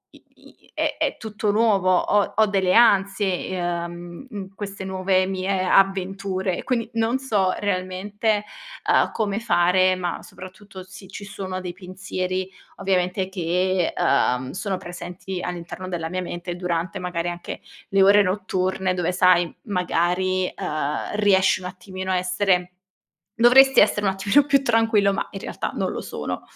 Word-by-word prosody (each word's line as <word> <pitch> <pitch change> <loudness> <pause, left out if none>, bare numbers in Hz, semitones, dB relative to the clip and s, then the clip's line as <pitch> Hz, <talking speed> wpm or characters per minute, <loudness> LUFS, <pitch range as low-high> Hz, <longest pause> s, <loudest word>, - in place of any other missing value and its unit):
i - - -19
i - - -21
è - - 0
è - - -1
tutto 215 -1 -2
nuovo, 200 -4 +3
ho 205 +1 +1
ho 220 - +5
delle 190 -2 +1
ansie, 195 -4 +3
ehm, 175 +1 -4
mhmm, 195 -4 -8
queste 200 -1 -6
nuove 185 0 +1
mie 190 0 -1
avventure. 195 0 +1
Quindi 240 -3 -1
non 230 +2 +1
so 205 -8 +1
realmente, 205 +2 -1 0.5
ehm, - - +3
come 210 -2 -1
fare, 185 -3 +3
ma 180 -2 -3
soprattutto 190 +1 -11
se 185 +1 -13
ci 200 - -9
sono 190 -1 -5
dei 180 -1 -6
pensieri, 185 0 -4 0.3
ovviamente, 185 0 0
che, 180 0 0
ehm 130 -1 +1
sono 190 0 -3
presenti 180 +1 -7
all'interno 180 +1 -6
della 165 -3 -3
mia 185 +1 -3
mente, 175 0 -5
durante 175 -1 -2
magari 175 -1 -2
anche 175 0 -7 0.3
le 195 0 +4
ore 200 +1 +7
notturne 185 -1 -1
dove 180 -1 0
sai, 180 -2 +4
magari, 185 -1 0
ehm, 150 -3 -3
riesci 195 -3 +3
un 180 - -5
attimino 185 +1 -6
a 185 - +2
essere 180 0 +1 0.7
dovresti 265 +3 +6
essere 205 0 +2
un 195 - +3
attimino 200 +9 +3
più 275 -1 +3
tranquillo, 225 -4 +3
ma - - -2
in 195 - -7
realtà - - -4
non - - -1
lo - - -5
sono. - - -5
185 Hz, 150 wpm, -23 LUFS, 180-200 Hz, 0.7 s, ore